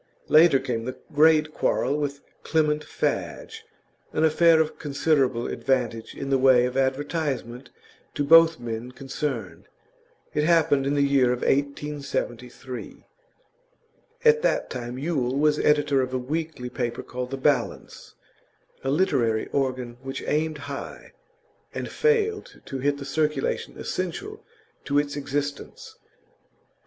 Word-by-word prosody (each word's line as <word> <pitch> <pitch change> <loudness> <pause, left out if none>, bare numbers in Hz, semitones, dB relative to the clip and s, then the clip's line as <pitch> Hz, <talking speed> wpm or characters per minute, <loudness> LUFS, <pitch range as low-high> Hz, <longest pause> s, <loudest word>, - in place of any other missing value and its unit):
Later 155 -2 +7
came 115 -3 -3
the 130 - -5 0.2
great 155 0 +4
quarrel 140 - 0
with 145 -1 -3 0.2
Clement 150 -2 +1
Fadge, 450 - -3 0.5
an 155 - +1
affair 160 +1 +5
of 155 -1 -1
considerable 140 -4 +1
advantage 120 -4 -2
in 140 0 -5
the 135 - +3
way 130 -2 +5
of 125 0 -3
advertisement 135 -2 -2 0.5
to 145 - 0
both 165 +2 +7
the 120 - -14
men 120 +2 -5
concerned. 130 -5 -5 0.7
It 150 - +1
happened 155 -4 +3
in 145 - +1
the 140 - +3
year 140 -2 +3
1873. 135 -2 -3 1.2
At 460 0 +6
that - - 0
time 120 -1 -5
Yule 135 -3 -1
was 150 +1 +2
editor 145 -2 +3
of 130 0 -3
a - - +2
weekly 140 -1 -4
paper 120 -2 -3
called 125 0 -5
The 135 - -4
Balance, 140 +2 -1 0.7
a 135 - -1
literary 120 -8 +1
organ 130 -3 -2
which 135 0 -6
aimed 155 0 0
high, 140 -1 -8 0.6
and - - -4
failed 440 -2 0
to 135 - -5
hit 140 +2 0
the 140 - -7
circulation 150 -1 -1
essential 395 - -4 0.4
to 145 - 0
its 145 -1 0
existence. 145 0 -5
140 Hz, 130 wpm, -25 LUFS, 130-155 Hz, 1.2 s, Later